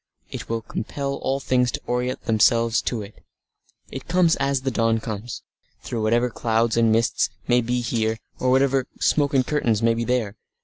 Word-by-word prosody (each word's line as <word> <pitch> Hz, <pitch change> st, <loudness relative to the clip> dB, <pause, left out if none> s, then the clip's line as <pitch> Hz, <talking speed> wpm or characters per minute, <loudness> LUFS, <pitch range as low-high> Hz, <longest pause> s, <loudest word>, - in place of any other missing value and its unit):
It -, -, -7 dB
will 115 Hz, -1 st, -2 dB
compel 140 Hz, +5 st, -4 dB
all 135 Hz, +1 st, -1 dB
things 125 Hz, -2 st, +1 dB
to -, -, -3 dB
orient 125 Hz, +1 st, -2 dB
themselves 115 Hz, 0 st, +3 dB
to 115 Hz, -4 st, -3 dB
it. 100 Hz, +1 st, -14 dB, 0.7 s
It 135 Hz, -, -7 dB
comes 170 Hz, -1 st, +3 dB
as 135 Hz, -1 st, 0 dB
the 135 Hz, 0 st, -1 dB
dawn 115 Hz, -1 st, +1 dB
comes, 110 Hz, +1 st, -6 dB, 0.4 s
through 115 Hz, -, -3 dB
whatever 120 Hz, +3 st, +2 dB
clouds 115 Hz, 0 st, 0 dB
and 115 Hz, -1 st, +3 dB
mists 115 Hz, +1 st, +2 dB, 0.2 s
may 125 Hz, 0 st, +4 dB
be 120 Hz, +1 st, -1 dB
here 110 Hz, -2 st, -1 dB, 0.2 s
or 130 Hz, -, +1 dB
whatever 135 Hz, 0 st, +2 dB
smoke 145 Hz, -2 st, +2 dB
and 130 Hz, -1 st, +3 dB
curtains 120 Hz, -8 st, 0 dB
may 115 Hz, 0 st, +4 dB
be 115 Hz, +1 st, -2 dB
there. 115 Hz, -4 st, -1 dB
120 Hz, 180 wpm, -23 LUFS, 115-130 Hz, 0.7 s, may